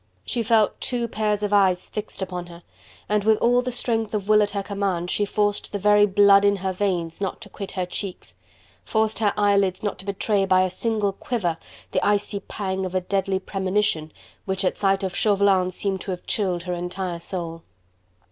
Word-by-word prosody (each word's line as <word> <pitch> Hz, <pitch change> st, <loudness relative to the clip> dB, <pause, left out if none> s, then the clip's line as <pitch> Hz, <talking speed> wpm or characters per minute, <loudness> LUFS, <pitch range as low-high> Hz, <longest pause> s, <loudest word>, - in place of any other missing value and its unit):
She 240 Hz, -, -1 dB
felt 220 Hz, -1 st, +2 dB
two 240 Hz, -2 st, -1 dB
pairs 210 Hz, -2 st, -1 dB
of 205 Hz, 0 st, -1 dB
eyes 190 Hz, -3 st, +3 dB
fixed 210 Hz, -2 st, -5 dB
upon 180 Hz, -2 st, -5 dB
her, 170 Hz, 0 st, -13 dB, 0.4 s
and 210 Hz, -1 st, +1 dB
with 220 Hz, 0 st, +4 dB
all 245 Hz, +2 st, +3 dB
the 250 Hz, 0 st, -3 dB
strength 225 Hz, -3 st, 0 dB
of 205 Hz, -1 st, -3 dB
will 215 Hz, 0 st, +5 dB
at 205 Hz, -, +2 dB
her 200 Hz, -1 st, -3 dB
command 195 Hz, -4 st, -2 dB
she 205 Hz, -, +1 dB
forced 205 Hz, 0 st, -1 dB
the 205 Hz, -, -2 dB
very 205 Hz, +1 st, +5 dB
blood 200 Hz, 0 st, +6 dB
in 200 Hz, 0 st, +4 dB
her 190 Hz, -1 st, -2 dB
veins 180 Hz, -3 st, -2 dB
not 195 Hz, -, -2 dB
to 215 Hz, -, -10 dB
quit 200 Hz, -1 st, -7 dB
her 185 Hz, -2 st, -1 dB
cheeks, 180 Hz, -, -6 dB, 0.5 s
forced 220 Hz, -, 0 dB
her 210 Hz, -2 st, +3 dB
eyelids 200 Hz, -2 st, +2 dB
not 205 Hz, -, -2 dB
to 190 Hz, -, -6 dB
betray 200 Hz, 0 st, +1 dB
by 185 Hz, 0 st, +4 dB
a 185 Hz, -, -1 dB
single 215 Hz, 0 st, 0 dB
quiver 190 Hz, -5 st, -2 dB, 0.3 s
the -, -, 0 dB
icy 205 Hz, 0 st, +1 dB
pang 190 Hz, -1 st, -4 dB
of 185 Hz, 0 st, -4 dB
a 185 Hz, -, +2 dB
deadly 195 Hz, +1 st, 0 dB
premonition 190 Hz, -4 st, -1 dB, 0.3 s
which 190 Hz, 0 st, -1 dB
at -, -, +1 dB
sight 195 Hz, 0 st, +2 dB
of 190 Hz, 0 st, -3 dB
Chauvelin 200 Hz, -3 st, +3 dB
seemed 190 Hz, +1 st, -2 dB
to -, -, -7 dB
have 180 Hz, -1 st, -4 dB
chilled 185 Hz, -5 st, -1 dB
her 180 Hz, 0 st, -3 dB
entire 175 Hz, 0 st, -4 dB
soul. 170 Hz, -2 st, -5 dB
200 Hz, 200 wpm, -24 LUFS, 185-210 Hz, 0.5 s, blood